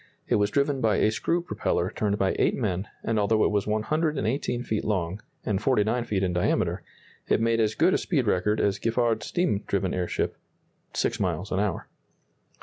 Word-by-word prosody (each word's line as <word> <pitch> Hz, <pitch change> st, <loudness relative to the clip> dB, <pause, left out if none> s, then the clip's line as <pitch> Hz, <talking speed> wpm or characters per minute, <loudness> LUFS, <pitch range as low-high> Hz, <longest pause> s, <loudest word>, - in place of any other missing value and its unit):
It -, -, +3 dB
was 105 Hz, 0 st, +2 dB
driven 140 Hz, +2 st, +1 dB
by 110 Hz, -3 st, +3 dB
a 110 Hz, -, +3 dB
screw 170 Hz, +9 st, 0 dB
propeller 90 Hz, -, -1 dB
turned 105 Hz, -1 st, 0 dB
by 95 Hz, -2 st, +1 dB
eight -, -, +3 dB
men, 100 Hz, -4 st, -2 dB, 0.2 s
and 115 Hz, -2 st, 0 dB
although 110 Hz, +1 st, +3 dB
it -, -, +2 dB
was 105 Hz, -1 st, 0 dB
118 130 Hz, +1 st, 0 dB
feet 110 Hz, -3 st, -2 dB
long, 95 Hz, -1 st, -1 dB, 0.2 s
and 100 Hz, -2 st, 0 dB
49 120 Hz, -1 st, +1 dB
feet 100 Hz, -4 st, -1 dB
in 90 Hz, -2 st, 0 dB
diameter, 90 Hz, -, +1 dB, 0.5 s
it -, -, +3 dB
made 115 Hz, 0 st, +2 dB
as 110 Hz, -1 st, +1 dB
good 180 Hz, +3 st, +4 dB
a -, -, +2 dB
speed 140 Hz, -8 st, 0 dB
record 105 Hz, +1 st, +1 dB
as 100 Hz, -1 st, +1 dB
Giffard's 115 Hz, -2 st, 0 dB
steam 170 Hz, -, 0 dB
driven 95 Hz, -2 st, 0 dB
airship 90 Hz, -1 st, -2 dB, 0.5 s
six -, -, -1 dB
miles -, -, -2 dB
an -, -, +1 dB
hour. -, -, -1 dB
110 Hz, 185 wpm, -26 LUFS, 100-120 Hz, 0.5 s, good